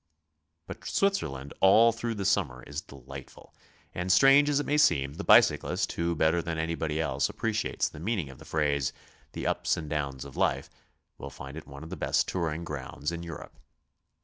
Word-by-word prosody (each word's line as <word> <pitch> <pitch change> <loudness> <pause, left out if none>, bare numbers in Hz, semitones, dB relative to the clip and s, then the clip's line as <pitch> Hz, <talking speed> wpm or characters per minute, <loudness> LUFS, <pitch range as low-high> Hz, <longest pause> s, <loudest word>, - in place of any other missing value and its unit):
But - - -9
Switzerland 70 - -1
all 110 +5 +7
through 115 0 -4
the 100 -2 -4
summer 85 -11 0
is 70 +3 -5
delightful, 70 -3 -12 0.4
and 90 +1 -1
strange 135 +6 +6
as 145 -1 +2
it 145 - -2
may 150 +1 +1
seem, 70 - +3
the - - -6
bicyclist, - - +4
who 85 0 -1
better 80 +2 +2
than 85 -1 -4
anybody 80 -1 -2
else 70 -3 0
appreciates 110 -1 -1
the - - -10
meaning 95 -2 -2
of 65 - -15
the - - -13
phrase, 75 -3 0 0.4
'hhe - - -6
ups - - 0
and 80 - -5
downs 70 -3 -3
of 70 - -11
life," - - 0 0.5
will - - -6
find 70 +1 -9
it 80 - -9
one 70 +1 -10
of 80 - -10
'the - - -5
best - - +1
'touring 85 -2 -2
grounds 75 0 -5
in 85 0 -5
Europe. 85 -3 -9
80 Hz, 185 wpm, -28 LUFS, 70-95 Hz, 0.5 s, all